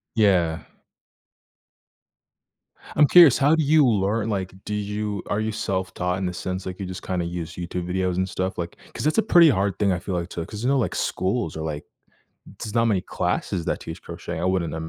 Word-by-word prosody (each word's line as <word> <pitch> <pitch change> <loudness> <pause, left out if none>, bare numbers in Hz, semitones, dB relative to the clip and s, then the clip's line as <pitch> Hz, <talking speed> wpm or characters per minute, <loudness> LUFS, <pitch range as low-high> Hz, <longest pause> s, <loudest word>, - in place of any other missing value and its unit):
Yeah. 90 -7 +3 2.4
I'm 150 0 +6
curious, 170 -6 +8
how 145 +4 +4
do 160 - +1
you 150 0 +5
learn 105 +1 +1
like, 95 -3 -2
do 105 - -4
you 105 -1 -3
are 105 - 0
you 110 0 -1
self-taught, 95 -3 -2
in 95 - -2
the 90 - -2
sense, 95 +1 -4
like, 95 +1 -6
you 100 - -3
just, 90 0 -7
kinda, 90 -2 -1
use 85 -1 -5
YouTube 90 0 -4
videos 90 -1 0
and 95 0 +1
stuff, 95 +1 -3
like 85 0 -5 0.2
'cause - - -2
it's 155 - +1
a 220 - +4
pretty 170 -6 +6
hard 100 -4 +1
thing, 100 -2 +3
I 90 - 0
feel, 90 +1 -4
like 85 0 -3
to 85 -1 -5
'cause, 105 +1 -8
you 125 - +2
know, 140 - +3
like, 125 - -1
schools 95 -3 -1
are, 80 - -4
like 75 -2 -4 0.8
there's 110 +1 -6
not 115 0 +3
many 100 -5 +1
classes 85 -4 -2
that - - 0
teach - - -8
crochet 85 - -6
I - - -2
wouldn't 90 -3 0
95 Hz, 210 wpm, -24 LUFS, 90-110 Hz, 2.4 s, curious